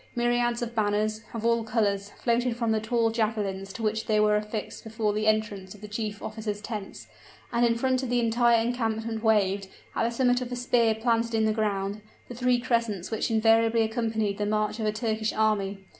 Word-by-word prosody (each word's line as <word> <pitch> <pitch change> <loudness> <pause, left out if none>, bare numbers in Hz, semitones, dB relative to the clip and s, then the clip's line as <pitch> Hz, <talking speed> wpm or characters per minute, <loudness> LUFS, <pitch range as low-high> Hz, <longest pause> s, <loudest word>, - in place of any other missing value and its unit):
Myriads 240 0 +1
of 235 0 -5
banners, 215 0 0
of 230 -1 -5
all 230 0 +2
colors, 205 -3 0
floated 240 0 +1
from 230 -2 0
the 220 - +2
tall 225 +1 +1
javelins 210 -4 -2
to 230 - -6
which 220 0 -1
they 215 -1 +3
were 210 0 +4
affixed 210 0 -4
before 220 -1 -1
the 215 +1 -1
entrance 210 -3 0
of 205 - -16
the 210 - -7
chief 210 -1 -4
officers' 215 -1 -4
tents, 210 -2 -7 0.5
and 235 +1 +2
in 230 - +2
front 260 +1 +1
of 260 - -4
the 245 0 +2
entire 235 0 +3
encampment 225 -1 -2
waved, 200 -3 +2 0.3
at - - +1
the 230 - +2
summit 245 +1 +2
of 250 0 -5
a - - -2
spear 240 -2 +2
planted 230 0 0
in 220 0 +2
the 215 - +2
ground, 205 -1 -1 0.3
the - - -6
three 250 0 +2
crescents, 230 -6 -1
which 220 - -1
invariably 225 0 +4
accompany 220 -2 -1
the 205 - -3
march 215 +1 0
of 215 - -1
a - - +2
Turkish 220 0 -1
army. 200 -3 0
220 Hz, 205 wpm, -27 LUFS, 210-235 Hz, 0.5 s, were